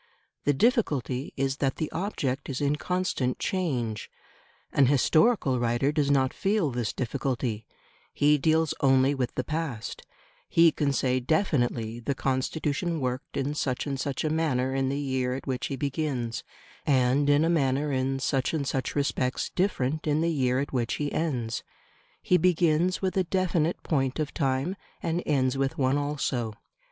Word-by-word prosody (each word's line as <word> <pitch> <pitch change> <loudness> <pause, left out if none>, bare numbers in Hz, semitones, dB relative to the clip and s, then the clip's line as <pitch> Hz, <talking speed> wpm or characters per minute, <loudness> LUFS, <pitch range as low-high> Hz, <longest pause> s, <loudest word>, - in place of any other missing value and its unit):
The 145 - +4
difficulty 145 - +1
is 135 0 0
that 135 -2 0
the 155 - -3
object 145 -8 -2
is 130 - -3
in 145 0 +1
constant 180 -8 -1
change. 125 - -2 0.6
An 140 -2 +5
historical 145 - +3
writer 120 +4 +1
does 150 -2 +1
not 135 -2 +2
feel 195 -7 +1
this 120 -3 -2
difficulty: 120 -4 -2 0.4
he 150 +1 +3
deals 160 +2 +2
only 135 0 +4
with 130 -4 -2
the 130 - -1
past; 150 -7 -4 0.5
he 165 -1 +6
can 145 -1 0
say 130 -1 +1
definitely, 120 - 0
the 135 +4 -2
Constitution 150 +6 -1
worked 130 -1 -3
in 140 +1 -1
such 130 -4 -1
and 140 -2 -3
such 135 -1 -2
a 155 - 0
manner 135 -5 0
in 135 -1 0
the 140 - -1
year 130 -3 -1
at 135 - -7
which 130 -2 -2
he 140 - -3
begins, 135 -4 -2 0.4
and 135 +1 +3
in 145 +2 +4
a - - +2
manner 145 -3 +1
in 135 0 0
such 135 +2 0
and 145 -3 -1
such 135 -1 -2
respects 135 -3 -1
different 155 -5 -1
in 150 +1 +2
the 170 +1 +1
year 130 -4 +1
at 140 +1 -3
which 120 -2 0
he 145 -1 -2
ends; 125 -8 -2 0.6
he 180 - +4
begins 175 +1 +2
with 185 - 0
a 190 - +4
definite 175 -2 0
point 135 -4 0
of 155 -2 -2
time 135 +5 0 0.3
and 170 +1 0
ends 135 -2 +1
with 135 +4 0
one 135 0 +2
also. 135 -6 -2
140 Hz, 165 wpm, -27 LUFS, 130-155 Hz, 0.6 s, he